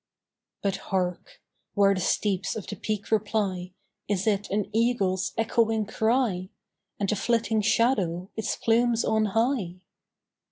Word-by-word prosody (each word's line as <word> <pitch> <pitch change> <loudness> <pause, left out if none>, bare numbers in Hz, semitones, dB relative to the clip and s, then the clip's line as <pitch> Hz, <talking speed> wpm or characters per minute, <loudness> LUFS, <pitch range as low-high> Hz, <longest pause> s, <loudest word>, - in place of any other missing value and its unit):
But 195 -1 0
hark! 190 - -3 0.4
where 200 -1 +5
the 185 - -2
steeps 190 +1 0
of 215 - -5
the - - -6
peak 210 -1 -4
reply, 205 -4 0 0.4
Is 195 -2 0
it 205 -2 0
an 205 0 0
eagle's 205 -5 +1
echoing 225 -1 +1
cry? 220 -4 0 0.5
And 200 - 0
the 210 - +1
flitting 225 0 +1
shadow, 200 -5 +1
its 220 - -2
plumes 235 0 +2
on 220 0 +2
high? 225 -3 0
210 Hz, 130 wpm, -26 LUFS, 190-225 Hz, 0.5 s, where